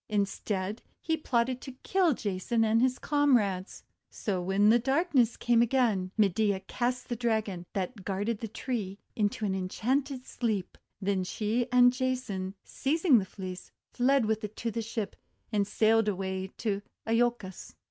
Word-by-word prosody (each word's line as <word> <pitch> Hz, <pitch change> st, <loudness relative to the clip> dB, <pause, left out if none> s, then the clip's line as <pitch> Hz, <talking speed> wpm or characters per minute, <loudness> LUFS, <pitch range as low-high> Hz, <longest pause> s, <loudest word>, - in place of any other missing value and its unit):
Instead 200 Hz, 0 st, -1 dB, 0.2 s
he 320 Hz, -, 0 dB
plotted 255 Hz, -4 st, 0 dB
to 265 Hz, -, -8 dB
kill 365 Hz, -7 st, +3 dB
Jason 210 Hz, +3 st, 0 dB
and 225 Hz, +1 st, +3 dB
his 255 Hz, 0 st, +2 dB
comrades. 235 Hz, -11 st, +1 dB, 0.3 s
So 190 Hz, -4 st, -2 dB
when 195 Hz, +3 st, +2 dB
darkness 270 Hz, -3 st, +2 dB
came 240 Hz, -1 st, +3 dB
again, 235 Hz, -6 st, +2 dB
Medea 200 Hz, -1 st, +2 dB
cast 245 Hz, +5 st, -2 dB
the 240 Hz, -, -2 dB
Dragon, 215 Hz, -7 st, -1 dB
that 195 Hz, +2 st, -3 dB
guarded 205 Hz, +3 st, -2 dB
the 225 Hz, -, -4 dB
tree, 215 Hz, -3 st, -4 dB, 0.2 s
into 210 Hz, 0 st, 0 dB
an 195 Hz, -, 0 dB
en 185 Hz, -1 st, -2 dB
chanted 265 Hz, +4 st, -1 dB
sleep. 215 Hz, -6 st, -2 dB, 0.2 s
Then 195 Hz, -1 st, 0 dB
she 220 Hz, +5 st, -1 dB
and 245 Hz, 0 st, +6 dB
Jason, 245 Hz, -7 st, -2 dB
seizing 295 Hz, -2 st, +3 dB
the 190 Hz, -, -3 dB
Fleece, 185 Hz, -1 st, -8 dB, 0.2 s
fled 260 Hz, 0 st, +3 dB
with 220 Hz, +1 st, 0 dB
it 210 Hz, 0 st, -5 dB
to 230 Hz, -, -3 dB
the 230 Hz, -, -2 dB
ship, 225 Hz, -2 st, -4 dB, 0.4 s
and 205 Hz, -2 st, +1 dB
sailed 225 Hz, +1 st, +3 dB
away 190 Hz, -1 st, -2 dB
to 205 Hz, -3 st, -1 dB, 0.3 s
lolcos. 230 Hz, -4 st, -1 dB
220 Hz, 150 wpm, -29 LUFS, 195-250 Hz, 0.4 s, and